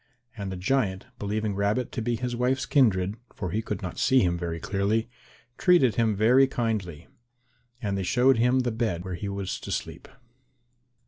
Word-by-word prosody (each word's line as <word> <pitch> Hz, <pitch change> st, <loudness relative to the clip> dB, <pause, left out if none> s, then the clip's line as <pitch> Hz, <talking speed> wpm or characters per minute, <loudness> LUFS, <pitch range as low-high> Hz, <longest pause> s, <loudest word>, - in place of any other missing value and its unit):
And 100 Hz, -3 st, -5 dB
the 95 Hz, -, -5 dB
giant, 95 Hz, -1 st, 0 dB
believing 105 Hz, +1 st, -2 dB
Rabbit 100 Hz, +5 st, 0 dB
to 120 Hz, -, -3 dB
be 120 Hz, +1 st, 0 dB
his 125 Hz, +1 st, -3 dB
wife's 125 Hz, +2 st, 0 dB
kindred, 105 Hz, -7 st, +2 dB, 0.2 s
for 95 Hz, -4 st, -4 dB
he 110 Hz, +5 st, 0 dB
could 105 Hz, -3 st, -5 dB
not 90 Hz, -, -5 dB
see 130 Hz, 0 st, +4 dB
him 90 Hz, -2 st, +1 dB
very 85 Hz, -1 st, -4 dB
clearly, 105 Hz, +6 st, -1 dB, 0.5 s
treated 175 Hz, -, +4 dB
him 110 Hz, -1 st, +1 dB
very 125 Hz, +6 st, +5 dB
kindly. 110 Hz, -, -3 dB, 0.8 s
And 100 Hz, -2 st, -1 dB
they 100 Hz, -, -1 dB
showed 125 Hz, +8 st, +3 dB
him 125 Hz, +2 st, +3 dB
the 125 Hz, -1 st, -1 dB
bed 110 Hz, -6 st, -2 dB
where 95 Hz, -, -4 dB
he 100 Hz, +3 st, -4 dB
was 100 Hz, -1 st, -4 dB
to -, -, -7 dB
sleep. -, -, -5 dB
110 Hz, 180 wpm, -26 LUFS, 95-125 Hz, 0.8 s, very